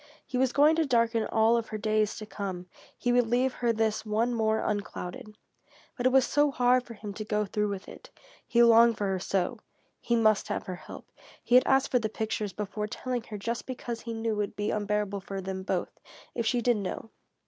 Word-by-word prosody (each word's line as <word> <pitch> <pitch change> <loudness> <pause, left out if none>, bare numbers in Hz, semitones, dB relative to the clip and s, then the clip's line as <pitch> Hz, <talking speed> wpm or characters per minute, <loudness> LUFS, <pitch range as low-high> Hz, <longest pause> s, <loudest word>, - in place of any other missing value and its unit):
He - - -7
was 255 0 +2
going 295 +4 +5
to 325 - +2
darken 230 -3 +2
all 225 +1 +3
of 230 - -2
her 215 - -5
days 215 0 +1
to 215 - -7
come; 190 -4 -5 0.3
he 245 - 0
would 245 -1 +3
leave 250 +2 +1
her 240 -1 0
this 220 -1 0
one 220 +3 0
more 220 -1 +1
unclouded. 205 0 -4 0.6
But 245 0 +1
it - - +3
was 265 0 +3
hard 255 -4 +3
for 235 -2 -11
him 205 -1 -7
to 215 - -5
go 210 0 0
through 210 +1 -1
with 200 -2 -5
it. - - -12 0.4
He 235 -1 +4
longed 230 -1 +6
for 205 - -1
her 190 -1 -1
so! 195 +5 -1 0.4
He 235 - 0
must 215 -2 +3
have - - -3
her 185 -1 -5
help. - - -11 0.4
He - - -2
had 250 - +7
asked 270 0 +3
for 250 - +4
the 220 -2 -2
pictures 215 -1 -3
before 210 +1 -4
telling 250 +3 -3
her 210 - -7
just 230 +4 -4
because 240 -2 -5
he 230 -1 -5
knew 225 0 -1
it - - -4
would 205 -1 -2
be 205 0 -1
unbearable 205 -1 -1
for 195 0 -6
them 190 0 -4
both, 190 - -2 0.4
if 235 -2 -2
she 245 +1 +1
did 240 -1 +2
know. 205 +2 -5
220 Hz, 220 wpm, -28 LUFS, 210-240 Hz, 0.6 s, had